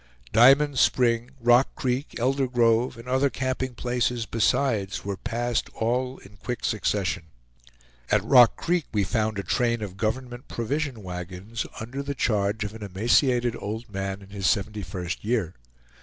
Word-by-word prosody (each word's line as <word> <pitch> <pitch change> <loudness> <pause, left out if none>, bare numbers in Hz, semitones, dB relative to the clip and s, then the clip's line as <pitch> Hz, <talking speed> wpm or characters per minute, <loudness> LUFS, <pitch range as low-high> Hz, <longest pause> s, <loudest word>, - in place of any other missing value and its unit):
Diamond 135 +3 +6
Spring, 120 -1 +2
Rock 120 +2 +4
Creek, 130 +3 -2
Elder 135 +2 +1
Grove, 120 0 +2
and 115 +2 -11
other 130 +2 +2
camping 130 -1 -3
places 120 -1 -1
besides, 110 -3 0
were 100 -1 -2
passed 120 +2 -2
all 125 +3 -1
in 100 +1 -16
quick 125 +5 -4
succession. 100 -5 -1 0.8
At - - +3
Rock 125 -4 +6
Creek 175 -3 0
we 105 -2 +1
found 110 +1 -1
a 100 - -2
train 115 -1 0
of 95 -2 -7
government 120 +4 -3
provision 130 -1 -3
wagons, 90 +5 -6
under 120 +5 -5
the 140 0 -4
charge 105 -2 0
of 105 0 -5
an 110 - -10
emaciated 120 +5 +2
old 110 +2 -6
man 95 0 -4
in 95 - -15
his 100 -2 -2
seventy 105 0 -1
first 90 -1 -5
year. 110 -6 0
115 Hz, 155 wpm, -25 LUFS, 105-125 Hz, 0.8 s, Diamond